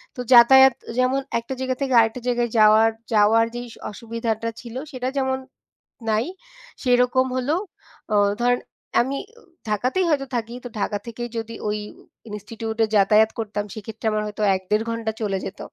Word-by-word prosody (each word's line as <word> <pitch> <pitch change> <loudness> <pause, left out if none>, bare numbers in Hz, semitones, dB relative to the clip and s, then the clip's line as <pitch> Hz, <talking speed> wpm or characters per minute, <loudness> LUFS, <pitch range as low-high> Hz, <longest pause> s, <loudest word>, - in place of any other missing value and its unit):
তো - - -12
যাতায়াত 265 +2 +8 0.2
যেমন 260 +2 +2 0.2
একটা 235 +3 -6
জায়গা 260 0 -1
থেকে 265 -2 0
আরেকটা 225 +2 +1
জায়গায় 240 -1 +1
যাওয়ার, 215 +1 +6 0.2
যাওয়ার 220 +2 +5
যেই 245 0 -5
স - - -14 0.2
অসুবিধাটা 230 +1 -3
ছিল 235 -1 -10 0.2
সেটা 255 -1 -4
যেমন 265 -1 +1 0.7
নাই 215 +2 +1 0.6
সেরকম 250 +1 +3
হলেও 285 +7 0 0.5
অ - - +3 0.3
ধরেন 245 0 +3 0.4
আমি 270 +3 -2 0.5
ঢাকাতেই 255 - 0
হয়তো 280 -3 +1
থাকি। 235 0 -3
তো - - -5
ঢাকা 205 - -1
থেকেই 240 +1 -6
যদি 225 0 -5
ওই 210 0 0 0.5
ইনস্টিটিউটে 220 +2 -3
যাতায়াত 210 +2 +5
করতাম 210 -1 -2
সেক্ষেত্রে 220 +1 -9
আমার 215 0 0
হয়তো 210 +1 -7
১-১.৫ 210 +4 -1
ঘন্টা 230 -1 -2
চলে 195 -2 0
যেত। 195 - -7
230 Hz, 155 wpm, -23 LUFS, 215-250 Hz, 0.7 s, যাতায়াত